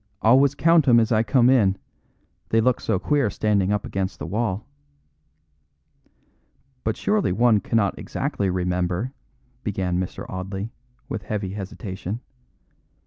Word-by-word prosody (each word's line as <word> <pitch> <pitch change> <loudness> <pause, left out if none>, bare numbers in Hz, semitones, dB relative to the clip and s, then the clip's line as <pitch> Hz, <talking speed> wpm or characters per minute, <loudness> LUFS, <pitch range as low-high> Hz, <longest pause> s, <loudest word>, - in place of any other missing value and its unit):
"Always 135 +5 +5
count 165 -1 +4
'em 120 -2 +7
as 115 +1 +1
I 110 -1 +4
come 120 +2 +3
in; 105 -7 +4 0.7
they 115 - +3
look 125 +2 +2
so 110 - 0
queer 140 +2 +1
standing 100 -2 +1
up 105 -1 0
against 95 0 -3
the - - -6
wall." 105 +2 -2 2.2
"But 110 - -1
surely 210 - +1
one 110 +2 +4
cannot 100 0 0
exactly 100 -2 -2
remember," 90 +5 -1 0.5
began 95 -4 -1
Mr. 95 - -5
Audley, 95 +4 -5 0.4
with 110 - -4
heavy 100 -1 -4
hesitation. 100 +1 -5
105 Hz, 130 wpm, -23 LUFS, 95-120 Hz, 2.2 s, em